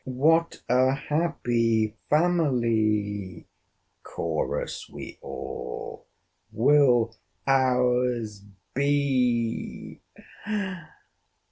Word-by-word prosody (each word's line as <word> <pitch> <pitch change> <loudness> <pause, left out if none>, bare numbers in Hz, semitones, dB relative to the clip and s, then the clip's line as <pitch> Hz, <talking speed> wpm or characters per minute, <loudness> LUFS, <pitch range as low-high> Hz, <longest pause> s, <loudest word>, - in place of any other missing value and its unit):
'What 160 +6 +1
a 130 +2 +3
happy 120 -8 0
family,' 110 - +1 0.5
chorus 80 -2 -3
we - - -9
all, - - -7 0.4
'will 120 -1 +4 0.3
our's 125 -5 +1 0.3
be! 130 -5 0
125 Hz, 50 wpm, -26 LUFS, 110-140 Hz, 0.5 s, will